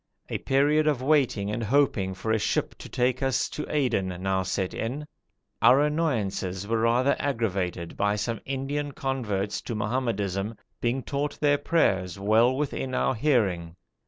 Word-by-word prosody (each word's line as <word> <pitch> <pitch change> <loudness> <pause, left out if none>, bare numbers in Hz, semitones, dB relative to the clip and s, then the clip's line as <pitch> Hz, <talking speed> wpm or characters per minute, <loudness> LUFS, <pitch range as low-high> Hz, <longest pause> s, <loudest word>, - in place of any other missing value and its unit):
A - - -2
period 150 +3 +2
of 140 -4 +1
waiting 130 -8 +2
and 110 +2 -2
hoping 110 -6 +1
for 110 +4 -3
a 110 - +2
ship - - 0
to - - -9
take 125 +1 0
us 135 -1 +1
to 150 - -5
Aden 125 -10 +1 0.2
now 95 0 +1
set 95 0 -2
in. 135 +7 -3 0.6
Our 125 +4 +6
annoyances 110 - -1
were 115 +1 +1
rather 120 +4 +3
aggravated 95 -10 -2
by 100 0 +2
some 110 +1 -3
Indian 140 +2 -3
converts 105 -8 -2
to 115 - -5
Mohammedanism 105 -3 -1 0.3
being 125 +2 0
taught 145 +1 -3
their 145 -1 +3
prayers 95 - +1
well 110 +6 +3
within 135 -3 -2
our - - +2
hearing. 100 - +1
120 Hz, 155 wpm, -26 LUFS, 100-140 Hz, 0.6 s, Our